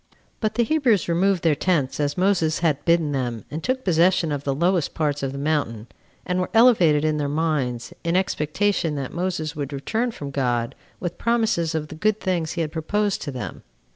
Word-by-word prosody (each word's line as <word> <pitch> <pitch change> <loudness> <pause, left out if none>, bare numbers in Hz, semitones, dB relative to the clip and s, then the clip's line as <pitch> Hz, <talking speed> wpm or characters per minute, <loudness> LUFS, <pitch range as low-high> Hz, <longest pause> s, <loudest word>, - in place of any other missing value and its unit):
But 215 -1 -1
the 240 - +3
Hebrews 240 - +2
removed 180 +2 +2
their 165 -2 +4
tents 150 -4 0
as 145 +2 -1
Moses 180 -4 +2
had 145 -3 +1
bidden 170 -3 +3
them, 120 -6 -3
and 155 +2 -5
took 260 +1 -1
possession 175 -1 +3
of 145 -1 -3
the 140 -1 -1
lowest 175 +1 +1
parts 145 -2 0
of 135 -1 -2
the 140 - -6
mountain; 140 -7 -1 0.4
and 180 0 -1
were 180 - -2
elevated 180 -11 +5
in 155 -1 +1
their 145 -1 -1
minds, 145 -6 -1
in 170 +1 0
expectation 185 -1 0
that 135 -2 -4
Moses 175 -3 -2
would 145 -1 -4
return 220 - -1
from 145 -11 -7
God 120 -4 0 0.3
with 175 -2 -5
promises 220 -9 +1
of 155 -1 -3
the - - -7
good 215 +6 +1
things 175 -4 -1
he 170 - -2
had 155 -2 -2
proposed 205 +5 -1
to 145 - -4
them. 130 -2 -6
160 Hz, 200 wpm, -23 LUFS, 145-185 Hz, 0.4 s, elevated